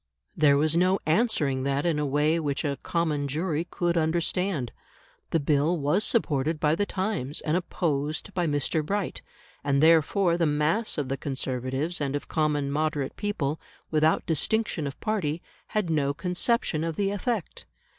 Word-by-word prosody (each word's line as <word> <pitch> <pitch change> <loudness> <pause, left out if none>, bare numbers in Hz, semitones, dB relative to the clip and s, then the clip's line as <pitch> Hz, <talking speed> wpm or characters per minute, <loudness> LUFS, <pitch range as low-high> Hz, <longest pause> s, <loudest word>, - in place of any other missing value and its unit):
There 145 -2 +5
was 155 +2 +2
no 185 +2 +3
answering 155 - +2
that 140 +2 0
in 165 -3 +1
a 150 - 0
way 150 +4 +2
which 145 -1 -2
a 140 -2 -2
"common 155 -4 -1
jury" 160 +3 -1
could 175 -1 0
understand. 165 - 0 0.6
The 165 - +2
Bill 150 +4 +2
was 150 +8 +1
supported 155 - +1
by 150 0 +2
the 205 +5 0
Times 185 -8 -2
and 155 +1 0
opposed 155 -1 -2
by 175 -2 0
Mr. 145 +2 0
Bright; 200 +4 -2 0.4
and 140 -1 +2
therefore 165 +3 +4
the 165 - +3
mass 150 +10 +1
of 145 -3 -1
the 135 +1 -2
Conservatives 135 +4 -2
and 140 -1 -1
of 145 - -4
common 150 -3 0
moderate 150 -2 -1
people, 160 -8 -2 0.3
without 155 0 +2
distinction 165 0 0
of 140 - -7
party, 185 -8 -1 0.3
had 210 -6 -1
no 140 -2 +1
conception 180 -1 0
of 165 -1 -2
the 200 +2 0
effect. 205 -1 -3
155 Hz, 160 wpm, -27 LUFS, 145-175 Hz, 0.6 s, There